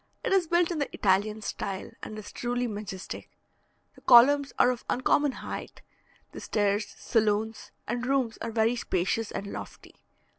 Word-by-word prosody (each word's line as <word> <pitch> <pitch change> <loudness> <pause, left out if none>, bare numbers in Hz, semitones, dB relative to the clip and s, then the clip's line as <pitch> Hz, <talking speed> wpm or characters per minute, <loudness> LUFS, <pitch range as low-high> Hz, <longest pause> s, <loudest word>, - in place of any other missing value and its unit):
It - - 0
is 375 -4 +3
built 345 +1 +2
in 330 - -2
the 285 - -2
Italian 210 +2 +1
style, 195 -1 -4
and 215 - -7
is 215 - -8
truly 245 0 -2
majestic; 205 -4 -6 0.6
the - - -19
columns 275 +3 +6
are 245 - +5
of 245 - -6
uncommon 280 +3 +2
height; - - -7 0.5
the - - -8
stairs, 205 0 0
saloons, 220 0 0 0.2
and 240 +2 -2
rooms 260 -4 0
are 230 - -3
very 225 +1 +2
spacious 205 0 -1
and 195 - -5
lofty. 200 - -8
225 Hz, 155 wpm, -28 LUFS, 205-255 Hz, 0.6 s, columns